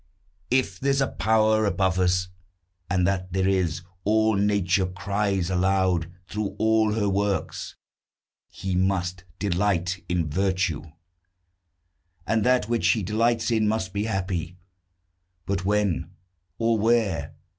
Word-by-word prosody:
If 130 0 +1
there's 135 0 +1
a 135 - +1
Power 110 0 +2
above 95 -2 +1
us 90 0 +1 0.6
(And 90 -1 +2
that 90 -1 -1
there 95 0 +1
is, 90 -3 0 0.2
all 110 +1 +3
Nature 100 -2 +2
cries 95 0 -1
aloud 95 -2 +1
Through 100 +2 -4
all 110 -1 +3
her 105 -2 0
works), 100 0 -1 0.7
he 95 -1 -4
must 90 -1 0
delight 90 -2 0
in 90 -2 0
virtue; 95 -1 0 1.4
And 110 +2 +1
that 125 -3 +2
which 120 0 +1
he 110 -4 +2
delights 115 +4 +1
in 110 -2 +2
must 105 -3 -1
be 100 +1 -1
happy. 90 -4 -3 0.9
But 95 0 -2
when? 105 -3 0 0.5
or 115 -1 +1
where? 110 -5 +1
100 Hz, 125 wpm, -25 LUFS, 90-110 Hz, 1.4 s, all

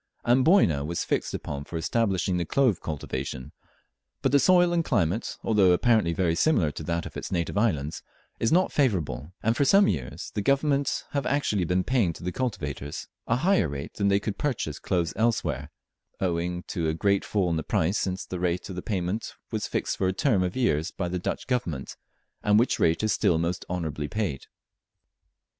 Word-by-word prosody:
Amboyna 125 - +4
was 85 +3 -2
fixed - - -1
upon 70 -1 -5
for 85 - -6
establishing 95 -1 0
the 90 - 0
clove 125 +1 +2
cultivation; 65 -4 -5 0.7
but - - +2
the 140 - +5
soil 175 +3 +5
and 170 -1 +2
climate, 90 - 0
although 100 -5 +4
apparently 110 -2 +3
very 85 -1 +1
similar 85 - +2
to 75 - -7
that 85 +1 -2
of - - -9
its - - -5
native 85 -1 -1
islands, 80 -9 0 0.4
is 115 - +1
not 180 +3 +3
favourable, 90 - 0
and 115 +2 +2
for 140 - +2
some 195 +8 +5
years 70 0 -3
the 105 - -1
Government 140 +4 +1
have 140 -1 -1
actually 115 -9 +1
been 90 +2 +1
paying 115 -9 +1
to 85 - -12
the 90 - -2
cultivators 75 - -4 0.2
a 115 - +2
higher 125 - +2
rate 70 +2 -6
than 100 - 0
they 100 0 +4
could 105 0 -4
purchase 120 - -2
cloves 85 -3 -1
elsewhere, 115 +2 0 0.5
owing 90 -1 -1
to 80 -3 -2
a 80 - -1
great 100 +3 +2
fall 95 -5 0
in - - +1
the 80 - -1
price 80 +5 0
since 95 0 -2
the 90 - -5
rate 90 0 -1
of 90 -1 -5
payment 95 +1 -2 0.2
was - - -2
fixed - - -2
for 95 - +2
a 95 - +1
term 105 -1 +2
of 90 0 -1
years 85 - +1
by 90 - -4
the 90 +1 -2
Dutch - - -3
Government, 90 - -2 0.5
and 105 0 +4
which 120 +4 +2
rate 80 +5 +2
is 110 - +2
still 85 - +2
most 85 +2 -2
honourably 80 -4 -3
paid. 90 -6 -3
90 Hz, 190 wpm, -26 LUFS, 85-115 Hz, 0.7 s, the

